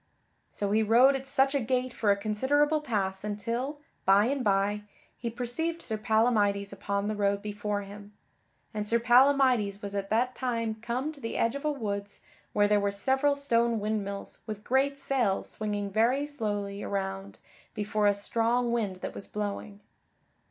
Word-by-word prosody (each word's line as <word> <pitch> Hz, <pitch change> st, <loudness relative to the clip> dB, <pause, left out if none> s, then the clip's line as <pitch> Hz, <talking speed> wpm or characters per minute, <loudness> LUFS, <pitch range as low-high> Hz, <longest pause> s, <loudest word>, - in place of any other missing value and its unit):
So 200 Hz, -1 st, -2 dB
he 215 Hz, +1 st, +3 dB
rode 240 Hz, +6 st, +5 dB
at 270 Hz, 0 st, -5 dB
such 270 Hz, +1 st, +2 dB
a 280 Hz, -, +2 dB
gait 255 Hz, +1 st, -1 dB
for 215 Hz, -, 0 dB
a 200 Hz, -, +4 dB
considerable 285 Hz, +9 st, +1 dB
pass 195 Hz, -8 st, -2 dB
until, 235 Hz, +8 st, -3 dB, 0.2 s
by 195 Hz, +2 st, +5 dB
and 270 Hz, +1 st, 0 dB
by, 205 Hz, 0 st, +1 dB, 0.3 s
he 235 Hz, -, -4 dB
perceived 250 Hz, +9 st, -2 dB
Sir 220 Hz, -, -3 dB
Palamydes 215 Hz, -3 st, +2 dB
upon 200 Hz, +1 st, -2 dB
the 215 Hz, -, -1 dB
road 200 Hz, -1 st, 0 dB
before 205 Hz, 0 st, -3 dB
him; 205 Hz, +1 st, -11 dB, 0.6 s
and 210 Hz, -1 st, -3 dB
Sir 235 Hz, +2 st, +2 dB
Palamydes 245 Hz, -4 st, +4 dB
was 200 Hz, 0 st, -5 dB
at 200 Hz, -1 st, -3 dB
that 245 Hz, +4 st, +1 dB
time 230 Hz, -4 st, -1 dB
come 250 Hz, +6 st, -2 dB
to 290 Hz, -3 st, -14 dB
the 230 Hz, -, -4 dB
edge 230 Hz, +1 st, +2 dB
of 280 Hz, +1 st, -6 dB
a 300 Hz, -, +2 dB
woods 200 Hz, -6 st, -4 dB, 0.3 s
where 205 Hz, 0 st, +3 dB
there 210 Hz, 0 st, +3 dB
were 200 Hz, 0 st, +1 dB
several 265 Hz, +7 st, +1 dB
stone 235 Hz, -5 st, +1 dB
windmills 205 Hz, -1 st, -3 dB
with 210 Hz, -1 st, -6 dB
great 275 Hz, +3 st, +1 dB
sails 255 Hz, -8 st, 0 dB
swinging 205 Hz, -2 st, -3 dB
very 240 Hz, +7 st, +2 dB
slowly 205 Hz, -7 st, -3 dB
around 195 Hz, 0 st, -4 dB, 0.4 s
before 210 Hz, -1 st, +1 dB
a 205 Hz, -, +4 dB
strong 235 Hz, +4 st, 0 dB
wind 215 Hz, -5 st, 0 dB
that -, -, -4 dB
was -, -, -7 dB
blowing. 205 Hz, 0 st, -5 dB
220 Hz, 170 wpm, -29 LUFS, 205-255 Hz, 0.6 s, rode